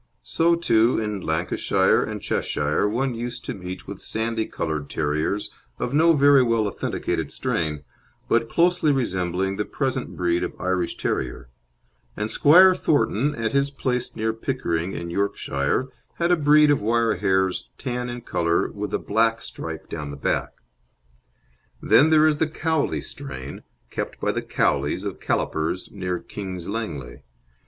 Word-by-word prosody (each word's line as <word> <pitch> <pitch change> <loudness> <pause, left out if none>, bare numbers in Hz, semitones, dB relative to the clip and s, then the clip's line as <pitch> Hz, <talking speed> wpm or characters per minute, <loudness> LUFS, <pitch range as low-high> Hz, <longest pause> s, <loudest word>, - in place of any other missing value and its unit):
So, 165 - +2
too, 120 -8 +3
in 105 -3 -3
Lancashire 80 +1 +1
and - - -5
Cheshire 75 +7 0
one 125 +4 0
used 120 +1 -5
to - - -3
meet 90 0 -7
with 100 -1 -8
sandy 110 0 -2
coloured 75 -3 -3
terriers 75 +8 -1 0.3
of 125 - -3
no 165 +3 +5
very 140 -2 +6
well 115 -3 +2
authenticated 100 - -2
strain, 75 -3 -2 0.4
but 115 0 +2
closely 175 -3 +3
resembling 95 -6 -1
the 105 - 0
present 130 -2 -3
breed 85 -1 +1
of - - -5
Irish 90 -2 -1
Terrier; - - -3 0.7
and 105 +1 -2
Squire 185 +10 +7
Thornton, 145 - +1
at 115 0 -2
his 140 0 +2
place 125 -3 -2
near 110 0 -1
Pickering, 95 -8 -2
in 85 0 -5
Yorkshire, 100 - -1 0.3
had 170 +1 +1
a - - +6
breed 150 -1 +5
of 145 - +2
wire 115 0 +2
hairs 95 -1 0
tan 125 -1 -3
in 120 0 -6
colour 85 -6 0
with 105 0 -3
a - - +2
black 115 +2 +1
stripe - - -7
down 75 -3 -5
the 70 - -7
back. - - -1 1.3
Then 150 +4 +5
there 155 -1 +6
is 150 -2 +2
the 160 - +1
Cowley 155 - 0
strain, 65 0 -7 0.3
kept - - -4
by - - +1
the - - -2
Cowleys 75 +7 0
of 100 - -4
Callipers, 80 +4 -1
near 90 -3 -3
King's 95 -2 -7
Langley. 80 - -5
110 Hz, 150 wpm, -24 LUFS, 90-135 Hz, 1.3 s, Squire